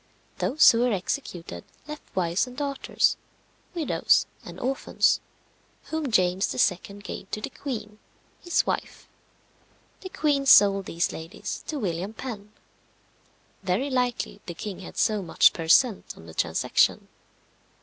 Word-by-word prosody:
Those 300 - +6
who 230 - 0
were 245 0 +2
executed 180 - -4 0.2
left 300 0 -7
wives 180 +4 +1
and 250 0 -11
daughters, 280 -1 0 0.6
widows 325 -3 +2 0.2
and - - -10
orphans, 265 +2 +1 0.7
whom 315 -3 -2
James 185 -2 +2
II. 190 +2 0
gave 195 - -7
to - - -3
the - - -6
queen, 215 -6 -6 0.4
his 345 -1 +1
wife. - - -4 0.9
The 375 - -8
queen 285 -5 0
sold 195 -4 +7
these 170 +2 -1
ladies 165 +5 -7
to 310 - -3
William 190 -3 -3
Penn. 210 -4 -7 1.1
Very 195 +9 -1
likely 250 -2 -1
the 175 - -6
king 205 +2 -6
had 185 - -10
so 215 -2 +2
much 175 - +4
per 165 -1 -5
cent. 225 +4 +3
on 80 - -13
the 80 - -11
transaction. 80 -1 +1
210 Hz, 135 wpm, -26 LUFS, 180-265 Hz, 1.1 s, sold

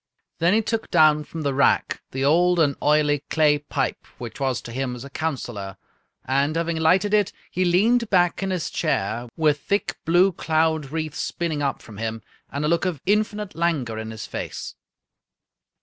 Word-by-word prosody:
Then 170 +5 +3
he 225 - +2
took 225 0 -2
down 155 -3 +5
from 160 0 -6
the 140 -1 0
rack 140 - +2
the 135 +1 -2
old 175 +4 +4
and 145 -4 +3
oily 150 -1 +3
clay 150 -2 +3
pipe, 145 -2 -3
which 120 -3 -8
was 135 -3 0
to 115 - -9
him 125 0 -3
as 125 - -8
a 140 - -11
counselor, 120 -11 -4 0.5
and, 140 +4 +1
having 165 0 -1
lighted 185 +6 +3
it, 205 -2 +3 0.2
he 185 - 0
leaned 220 +7 +3
back 175 -2 +2
in 195 - -1
his 180 -4 -2
chair, 120 - -1
with 150 -2 +2
thick 200 +8 -1
blue 175 +4 +4
cloud 160 -3 0
wreaths 155 0 -4
spinning 160 -4 -2
up 140 -1 -2
from 105 -3 -12
him, 110 0 -4 0.3
and 145 +2 -2
a - - +2
look 170 +2 +1
of 175 -6 -2
infinite 210 0 0
languor 150 -10 -1
in 110 0 -5
his 110 -1 -7
face. - - -6
155 Hz, 180 wpm, -23 LUFS, 135-175 Hz, 0.5 s, down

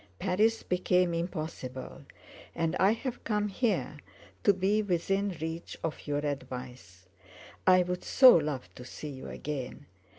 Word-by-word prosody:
Paris 210 +4 +1
became 180 -1 +2
impossible—and 160 0 -5
I 195 +2 +5
have 250 +2 -5
come 210 -1 0
here 195 - -1 0.4
to - - +6
be 200 +3 +1
within 195 0 0
reach 160 +2 -5
of 160 -1 -4
your 145 0 -1
advice. 125 -8 -6 0.6
I 185 -1 +7
would 180 0 -4
so 255 -2 +8
love 150 -5 -1
to 125 - -10
see 150 +4 -8
you 130 -2 -8
again. 145 -1 -6
170 Hz, 130 wpm, -30 LUFS, 145-195 Hz, 0.6 s, so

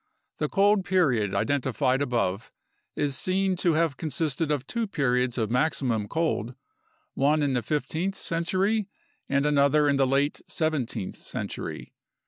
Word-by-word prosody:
The - - 0
cold 200 0 +3
period 140 - +1
identified 135 -1 +1
above 115 -6 -1 0.4
is 145 -2 0
seen 190 +4 0
to 175 -2 +2
have 160 -2 +1
consisted 155 -1 -1
of 145 -3 -1
two 230 - -2
periods 125 -7 0
of 110 -2 -1
maximum 125 -5 0
cold, 140 -7 -1 0.6
one 150 +2 +2
in 140 -2 +1
the 125 - +1
fifteenth 160 - -2
century 190 +5 0 0.4
and 140 +1 +2
another 145 0 +4
in 140 -1 +3
the 135 -1 +3
late 140 +2 +1
seventeenth 150 - -2
century. - - -6
145 Hz, 135 wpm, -26 LUFS, 130-170 Hz, 0.6 s, another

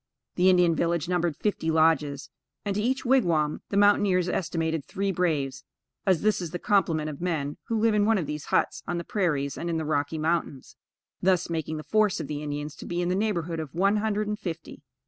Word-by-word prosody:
This 180 +1 +3
Indian 180 -3 +5
village 170 -1 0
numbered 175 -4 0
fifty 195 -6 -1
lodges; 155 -3 +2 0.3
and, 200 - 0
to 210 - 0
each 260 +5 -1
wigwam, 170 - +2
the 200 - -1
mountaineers 200 -3 +4
estimated 165 -3 -1
three 195 +6 -2
braves, 145 -7 -1 0.4
as 185 -2 +3
this 215 -3 +2
is 175 - -4
the 175 - -4
complement 165 -5 +1
of 150 -1 -6
men 155 -5 -2
who 225 - 0
live 225 0 +3
in 210 0 +3
one 225 -1 +4
of 175 - -1
these 150 0 -5
huts - - 0
on 175 - -1
the 170 - -3
prairies 150 -9 -1
and 170 - -3
in 165 - 0
the 160 - -2
Rocky 150 +1 -1
Mountains; 155 -4 -2 0.5
thus 180 -2 +2
making 160 -1 -2
the 155 - -6
force 215 -1 +2
of 160 - -3
the 145 0 -4
Indians 145 0 -4
to - - -9
be 175 - -2
in 175 0 0
the 180 - +1
neighborhood 175 -6 -1
of 155 -1 -6
one 195 +4 +3
hundred 210 0 -1
and 210 0 -3
fifty. 165 -3 -6
170 Hz, 215 wpm, -26 LUFS, 155-195 Hz, 0.5 s, Indian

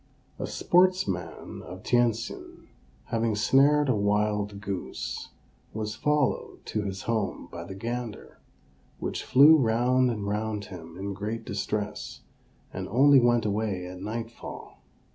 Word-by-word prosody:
A - - -2
sportsman 175 - +1
of 95 +1 -10
Tientsin, 120 -1 -1 0.4
having 115 -1 +1
snared 140 +7 +4
a 130 - +3
wild 105 0 0
goose, 100 -3 -5 0.5
was 110 0 -3
followed 150 +3 0
to 105 - -2
his 95 -2 -4
home 110 -4 -2
by 85 0 -7
the 95 - -8
gander, 115 +2 -5 0.6
which - - -4
flew 145 +5 +7
round 125 +1 +3
and 105 -4 -3
round 105 0 -2
him 85 -2 -10
in 100 +1 -4
great 105 +4 -4
distress, 105 +1 -3 0.5
and 95 0 -4
only 135 +5 +6
went 120 -2 +3
away 100 -3 -1
at 90 0 -8
nightfall. 115 +2 -7
110 Hz, 125 wpm, -27 LUFS, 100-120 Hz, 0.6 s, flew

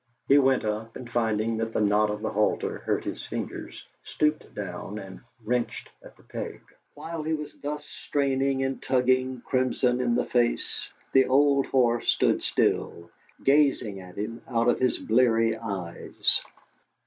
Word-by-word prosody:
He 140 +1 +7
went 130 -3 +3
up, 110 +2 -3
and 125 - -8
finding 115 -1 0
that 115 0 -2
the - - 0
knot 105 0 +3
of 105 0 -4
the - - -1
halter 105 +1 0
hurt - - -1
his - - -5
fingers, - - -6 0.2
stooped 150 0 -1
down 100 +1 -5
and 95 -2 -9 0.3
wrenched 120 +1 -2
at - - -15
the - - -21
peg. - - -6 0.4
While 165 -1 -5
he 155 +1 -1
was 150 -1 -7
thus 150 +1 -4
straining 135 -2 0
and 135 0 -2
tugging, 130 0 +1
crimson 125 -1 +1
in 120 -1 +1
the - - +1
face, 120 -1 0 0.2
the 135 0 +5
old 140 +1 +4
horse 120 -3 +2
stood - - +3
still, 85 0 0 0.3
gazing 135 -8 +3
at 90 -1 -12
him 110 +3 -4
out 115 -2 +1
of 120 - +3
his 130 -1 +2
bleary 115 -1 +3
eyes. 100 -7 -1
120 Hz, 160 wpm, -27 LUFS, 110-135 Hz, 0.4 s, He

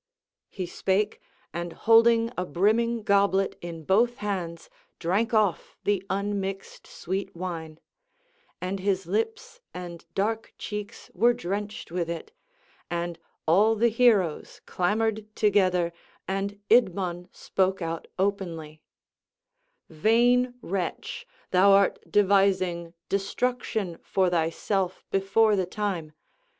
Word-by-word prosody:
He 185 - -4
spake, 190 +4 -1 0.3
and 170 0 -4
holding 230 0 +5
a 180 - -1
brimming 220 +6 +1
goblet 200 -1 +2
in 165 -2 -7
both 230 +8 +3
hands 180 -5 -4 0.3
drank 200 +7 0
off 215 -6 +1
the 200 -2 +1
unmixed 195 0 -3
sweet 195 +2 -4
wine; 165 -3 -5 0.8
and 185 +2 -3
his 190 0 0
lips 460 +2 -3
and 175 -2 -7
dark 220 +3 -1
cheeks 210 -1 -7
were 235 +6 +4
drenched 205 -3 -4
with 170 -1 -2
it; 170 - -5 0.6
and 170 -1 -3 0.3
all 205 +7 +5
the 235 +2 +3
heroes 220 -8 +2
clamoured 215 +3 0
together 185 -5 +2 0.3
and 195 +1 -2
Idmon 185 -6 +2
spoke 190 0 0
out 165 -1 -4
openly: 170 -6 -2 1.1
"Vain 240 +8 +3
wretch, 190 - -4 0.2
thou 195 +2 +6
art 200 -1 +4
devising 185 -4 +2
destruction 200 -2 -1
for 190 -2 +1
thyself 175 +3 -1
before 200 +3 +3
the 190 -2 0
time. 180 -6 -3
195 Hz, 110 wpm, -27 LUFS, 175-215 Hz, 1.1 s, thou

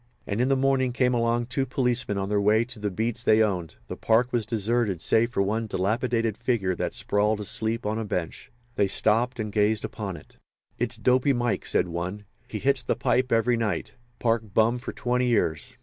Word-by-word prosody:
And 105 +3 -1
in 125 - +2
the 135 - +4
morning 130 -1 +1
came 125 0 +2
along 120 0 +1
two 135 +2 -2
policemen 125 -5 0
on 95 0 -2
their 105 0 +1
way 110 +3 +3
to 125 -2 -11
the 105 0 -1
beats 110 +4 -2
they 110 -2 +4
owned. 90 -6 -2
The - - -5
park 120 +3 +2
was 115 -4 0
deserted 110 -3 0
save 115 +6 +2
for 100 -5 0
one 110 +3 -1
dilapidated 115 +3 -1
figure 115 -6 0
that - - -3
sprawled, 105 +1 +1
asleep, 110 +2 -1
on 110 +2 -1
a - - -2
bench. 90 -6 -4 0.3
They 100 - +3
stopped 115 +5 +1
and 105 -1 -3
gazed 105 +1 +1
upon 100 -5 -5
it. - - -17 0.4
"It's 120 0 -2
Dopy 125 +5 +3
Mike," 120 -2 -1
said - - +1
one. 90 +5 -5 0.2
"He 110 - -5
hits 135 +4 +2
the - - -1
pipe 130 +1 +1
every 115 +1 +3
night. 105 -7 -2 0.3
Park 115 -4 -1
bum 115 +2 +3
for - - -6
twenty 125 0 0
years. 95 -10 0
115 Hz, 200 wpm, -26 LUFS, 105-120 Hz, 0.4 s, the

